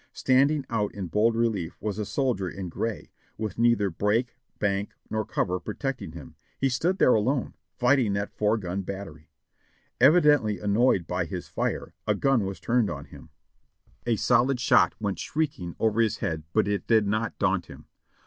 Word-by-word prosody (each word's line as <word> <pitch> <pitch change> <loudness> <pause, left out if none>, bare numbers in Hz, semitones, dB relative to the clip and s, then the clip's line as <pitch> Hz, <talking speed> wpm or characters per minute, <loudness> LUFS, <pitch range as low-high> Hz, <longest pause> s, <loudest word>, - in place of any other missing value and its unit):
Standing 140 +2 +2
out 110 -3 -2
in 95 -4 -5
bold 110 +6 +2
relief 110 -7 -1
was 105 -1 -3
a 105 - -3
soldier 120 -10 -1
in 95 0 -6
gray, 110 +4 -4 0.3
with 110 -1 -4
neither 115 -5 +3
brake, 110 +8 0 0.2
bank, 100 0 -1 0.2
nor 110 0 0
cover 90 -2 -1
protecting 105 - -4
him. 80 -5 -10 0.3
He 135 - +2
stood 165 +9 0
there 130 - +5
alone, 125 +5 0 0.2
fighting 125 -4 +3
that 100 +1 -3
four 105 +1 +2
gun 95 -1 -3
battery. 90 -5 -8 0.7
Evidently 145 - +5
annoyed 100 0 +2
by - - -2
his - - -6
fire, - - -3
a - - +2
gun 135 -7 +2
was 95 0 -5
turned 120 -3 +1
on - - -6
him; - - -14 0.8
a 115 - +3
solid 125 +3 +2
shot 120 - +4
went 100 -3 -2
shrieking 140 - -3
over 110 0 +2
his 110 -3 +1
head 80 -6 -3
but 110 +2 +2
it 100 -1 -2
did 110 -2 +4
not 110 +2 -1
daunt 95 -4 0
him. - - -12
110 Hz, 170 wpm, -26 LUFS, 100-125 Hz, 0.8 s, there